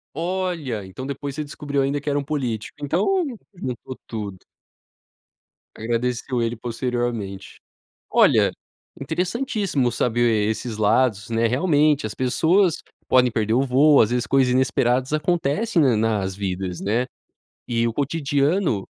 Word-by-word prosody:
Olha! 165 - -2
Então 95 +8 -8
depois 140 0 -5
você 155 - -3
descobriu 145 -1 -3
ainda 140 +1 0
que 145 - -3
era 145 - +1
um 140 - -4
político, 130 -7 -3
então, 205 - +1 0.3
juntou 130 -5 -6
tudo. 105 -4 -5 1.4
Agradeceu 120 +2 -1
ele 115 0 -1
posteriormente. 120 -5 -4 0.5
Olha, - - +4 0.5
interessantíssimo 180 - -1
saber 115 -3 +1
esses 110 0 -3
lados, 105 0 +2
né. 115 0 +2
Realmente 145 +1 +2
as 105 - -6
pessoas 165 +8 +2 0.3
podem 125 -1 +4
perder 110 0 0
o 130 - +3
voo, 140 +3 +5
às 110 - +4
vezes 125 -1 0
coisas 135 -2 +3
inesperadas 130 +1 +1
acontecem, 170 +4 +1
né, 130 -5 +4
nas 105 -4 0
vidas, 95 -2 -3
né, 115 +5 0 0.6
e 115 -1 +1
o 115 - -2
cotidiano 145 - 0
130 Hz, 130 wpm, -23 LUFS, 115-150 Hz, 1.4 s, voo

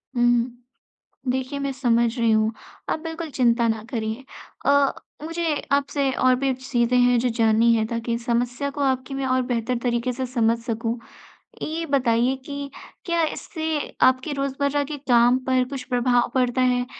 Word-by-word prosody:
हुँ, 240 - +2
हुँ। 240 +1 -1 0.5
देखिए 260 +2 -3
मैं 275 0 -2
समझ 235 -2 +1
रही 230 -1 +2
हूँ। 220 0 +3 0.4
आप - - 0
बिल्कुल 325 0 -5
चिंता 235 -2 +2
ना 220 -1 -1
करिए। 225 +2 -3 0.4
अ, 280 -1 +4 0.3
मुझे 330 -1 -1 0.2
आपसे 280 -1 +1
और 255 0 +3
भी 270 -1 +1
चीज़ें 250 -1 0
हैं 245 0 +4
जो 245 +1 +1
जाननी 225 +1 +4
है 220 -1 +1
ताकि 230 0 -3
इस 235 0 -4
समस्या 245 +3 0
को 285 - -5
आपकी 260 0 0
मैं 270 0 -2
और 255 0 +2
बेहतर 245 0 -1
तरीक़े 240 +1 0
से 260 +1 -3
समझ 235 -2 +1
सकूँ। 230 0 -2 0.7
ये 325 +2 -3
बताइए 255 -2 +2
कि 280 -1 -5 0.3
क्या 340 -1 +1
इससे 320 0 -4 0.4
आपके 260 +4 -4
रोज़मर्रा 280 +1 -1
के 295 +1 -5
काम 240 +1 +5
पर 255 -1 +3
कुछ 275 -2 -5
प्रभाव 245 -1 +2
पड़ता 255 0 +1
है 250 -1 +2
255 Hz, 170 wpm, -23 LUFS, 235-275 Hz, 0.7 s, काम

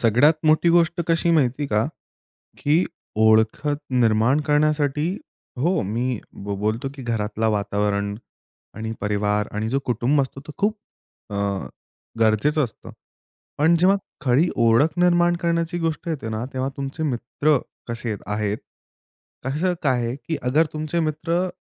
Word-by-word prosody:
सगळ्यात 125 +8 +5
मोठी 155 +2 +4
गोष्ट 170 0 +3
कशी 165 +1 +2
माहिती 140 -3 +2
आहे - - -1
का, 105 +1 +2 0.7
की 155 +5 +3 0.4
ओळखत 110 +7 +3 0.2
निर्माण 115 +5 +3
करण्यासाठी 150 +1 +2 0.5
हो, 170 +6 +2
मी 115 +4 -1 0.3
ब 100 0 -2
बोलतो 110 +5 -1
की 135 - -9
घरातला 110 -1 -1
वातावरण 100 -1 0 0.6
आणि 110 0 -4
परिवार 105 0 0
आणि 110 +1 -1
जो 135 - +2
कुटुंब 125 +4 +2
असतो 135 +1 -6
तो 150 - -7
खूप 210 +2 +1 0.5
अ, - - -5 0.9
गरजेचं 140 +8 +3
असतं. 115 - -9 0.7
पण 160 +3 +4
जेव्हा 190 +3 +5 0.2
खरी 145 +5 +3
ओळख 120 +8 +3
निर्माण 175 -1 +4
करण्याची 170 0 0
गोष्ट 165 0 -2
येते 140 -8 -3
ना, 110 +2 -3
तेव्हा 130 0 -1
तुमचे 140 +3 -4
मित्र 140 +2 +1 0.3
कसे 115 -1 -3
अ, - - -3 0.2
आहेत? 105 0 -1 0.9
कसं 160 +7 0
काय 130 -4 +2
आहे, 120 - -2
की 160 +2 -4
अगर 150 +6 +3
तुमचे 155 +2 -2
मित्र 165 +3 0
135 Hz, 140 wpm, -23 LUFS, 110-160 Hz, 0.9 s, सगळ्यात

